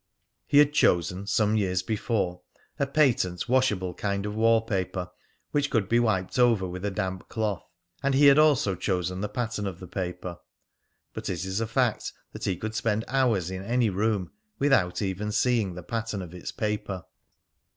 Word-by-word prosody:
He 145 - +3
had 145 0 +6
chosen, 90 - +2
some 105 0 +2
years 90 -4 +1
before, 100 -4 -1 0.4
a 140 - +1
patent 125 - +2
washable 110 -8 +1
kind 100 +2 -2
of 105 - -3
wall 115 +1 +4
paper 95 -4 -3 0.4
(which 145 -1 +1
could 110 -6 +1
be 120 +3 +3
wiped 110 -2 0
over 115 -6 +4
with 90 +1 -6
a 100 - 0
damp 95 -2 -4
cloth), 110 -4 -2 0.4
and 140 -1 +1
he 145 +2 +5
had 140 +1 +8
also 145 -10 +4
chosen 90 0 -2
the 105 - -2
pattern 110 -2 -2
of 90 -2 -6
the 95 - -8
paper, 90 -1 -5 0.7
but - - -5
it 90 0 -3
is 95 +3 -2
a 115 - -1
fact 120 0 0 0.2
that - - -6
he 95 -3 0
could 110 +3 -4
spend 110 0 0
hours 115 -10 +1
in 95 0 -4
any 120 0 +1
room 100 -1 0 0.3
without 110 -10 +2
even 100 +2 -2
seeing 110 -5 +1
the 90 - -7
pattern 110 -2 -3
of 90 -1 -10
its 90 - -6
paper. 105 -4 -3
105 Hz, 180 wpm, -27 LUFS, 95-115 Hz, 0.7 s, had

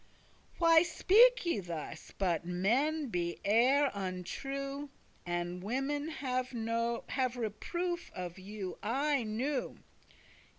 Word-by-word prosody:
Why 330 -2 +6
speak 450 +7 +5
ye 335 -11 +1
thus? 165 -3 -6
but 175 -5 +1
men 245 - +1
be 175 -4 -2
e'er 260 +7 +4
untrue, 275 +10 -4 0.4
And 175 +1 -2
women 270 +8 -1
have 255 -4 -2 0.9
reproof 345 - -3
of 180 0 -5
you 195 -1 -6
aye 275 +5 +1
new. 245 +5 -2
250 Hz, 95 wpm, -33 LUFS, 185-290 Hz, 0.9 s, Why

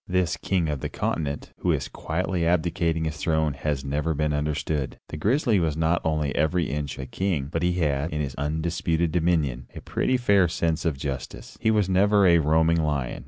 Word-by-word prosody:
This 90 -1 +1
king 90 -4 0
of 75 -2 -2
the - - -4
continent, 70 -3 -3
who - - +1
is - - -1
quietly 90 +2 -2
abdicating 85 -1 +1
his 80 -1 -3
throne, 80 -1 +1
has 70 -1 -3
never 75 +3 -1
been 75 0 0
understood. 75 -1 -2
The - - -6
grizzly 115 - +2
was 80 -3 0
not 80 +2 +1
only 75 -3 0
every 80 +1 +1
inch 75 -1 -3
a 65 - -5
king, 75 0 -2
but 80 - -1
he 90 0 +2
had, 75 -3 0
in 75 - -2
his 70 -3 -2
undisputed 80 +3 -1
dominion, 80 -8 0
a - - -7
pretty 130 - 0
fair 100 -7 +4
sense 80 0 -1
of 80 -5 0
justice. 70 -2 -6
He - - +2
was 105 -3 +3
never 100 +2 +4
a 85 -2 +6
roaring 80 +2 +3
lion. 70 -5 -1
80 Hz, 195 wpm, -25 LUFS, 75-85 Hz, -, a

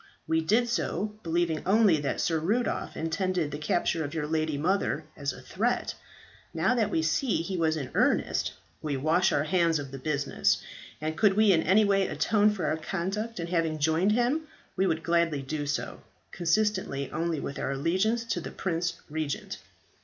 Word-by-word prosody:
We 160 0 +1
did 220 +9 +2
so 215 -3 -1
believing 165 -2 0
only 200 -3 +4
that 145 - -2
Sir 165 -2 +1
Rudolph 215 +10 -1
intended 165 0 -1
the 145 - -5
capture 165 +1 0
of 145 +2 -5
your 155 -2 -1
lady 155 -1 -1
mother 185 +7 0
as - - -2
a - - -11
threat. - - -1 0.6
Now - - +2
that 225 -4 +1
we 160 -5 0
see 210 - +1
he 190 +2 -4
was 160 -2 +1
in 140 -4 -5
earnest, - - +1 0.3
we 145 -3 -2
wash 165 +7 +2
our 145 - +2
hands 170 -1 +2
of 140 -2 -6
the 135 - -7
business; 140 -1 +1 0.4
and 155 +1 -3
could 200 +2 +3
we 215 -1 +5
in 165 -3 +4
any 200 +6 +4
way 195 -1 +2
atone 210 -1 +3
for 210 -3 -3
our 155 - 0
conduct 195 +6 -3
in 170 - -2
having 165 -2 0
joined 160 +7 +2
him, 255 +7 +1 0.3
we 190 0 +2
would 165 -2 -1
gladly 170 -4 +1
do 145 +1 -3
so, 145 - -3 0.3
consistently 175 -6 0
only 165 -2 -1
with 140 - -5
our - - -2
allegiance 190 +11 +1
to 230 - -2
the - - -6
Prince 175 -1 -2
Regent." 155 -2 -4
170 Hz, 185 wpm, -28 LUFS, 155-200 Hz, 0.6 s, we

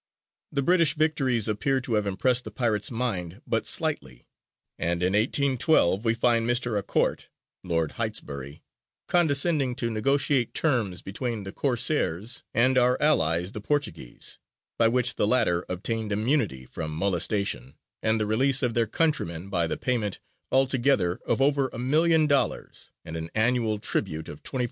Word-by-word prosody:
The 140 -2 -1
British 165 -2 +3
victories 135 -8 +1
appear 130 +6 0
to 125 -2 -4
have 105 -2 +1
impressed 125 +6 +1
the 110 - -7
pirates' 110 -2 -1
mind 100 -8 -3
but - - -1
slightly; 65 -3 -1 0.5
and 85 +1 -1
in 90 +1 +1
1812 125 - +2
we 115 -1 +2
find 115 0 +2
Mr. 120 -2 +1
A'Court - - -1 0.4
(Lord 80 -3 -1
Heytesbury) 70 0 -4 0.4
condescending 150 -5 +2
to 120 -2 -2
negotiate 135 +2 +1
terms 115 - 0
between 110 +2 -4
the 95 - -7
Corsairs 120 - 0
and 130 +3 +3
our 125 +1 +2
allies 90 - +2
the 105 - -7
Portuguese, 145 - -2 0.4
by 115 - +5
which 125 +1 +1
the - - +2
latter 90 -8 +2
obtained 110 +4 -3
immunity 105 - 0
from 80 +4 -6
molestation 90 - -1 0.3
and 110 0 +2
the 105 - +1
release 130 +6 +2
of 120 -2 +1
their 115 -1 +1
countrymen 100 - -1
by 85 -4 +2
the - - -3
payment 115 -6 -2 0.3
altogether 130 -8 +2
of - - +1
over 140 -1 +2
a - - -8
million 155 +6 +2
of 150 - 0
dollars, 140 -1 -1 0.2
and 80 -1 -7
an 80 0 -5
annual 115 -1 +1
tribute 80 -5 -2
of 75 - -10
$24,000. 130 - -5
115 Hz, 155 wpm, -26 LUFS, 95-135 Hz, 0.5 s, by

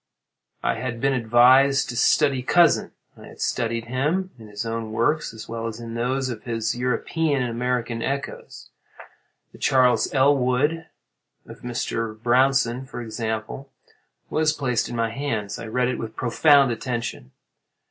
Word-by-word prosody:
I - - 0
had 120 -2 -4
been 135 +2 +1
advised 130 +4 +4
to 120 - -5
study 135 +2 +3
Cousin. 170 +7 +3 0.2
I - - -13
studied 115 -1 -2
him 150 +10 -1
in 110 - -12
his 105 +2 -6
own 115 -1 -4
works 150 +8 0
as 110 -2 -10
well 115 0 -4
as 115 0 -6
in 115 -1 -7
those 130 +3 -1
of 115 -3 -6
his 115 -1 -2
European 130 +4 0
and 120 - -2
American 120 -1 -2
echoes. 140 +3 -5 0.8
The - - -16
'Charles 130 -2 +3
Elwood' 140 +3 +2 0.6
of - - -12
Mr. 115 -2 -3
Brownson, 130 +1 +2
for 125 - -7
example, 110 +3 -5 0.6
was 155 0 +1
placed 125 -6 -1
in 120 - -5
my 115 -1 0
hands. 115 -6 -3
I 115 - -7
read 125 +3 0
it 125 - -2
with 110 -1 -6
profound 140 +2 +4
attention. 115 - -4
125 Hz, 145 wpm, -23 LUFS, 115-135 Hz, 0.8 s, advised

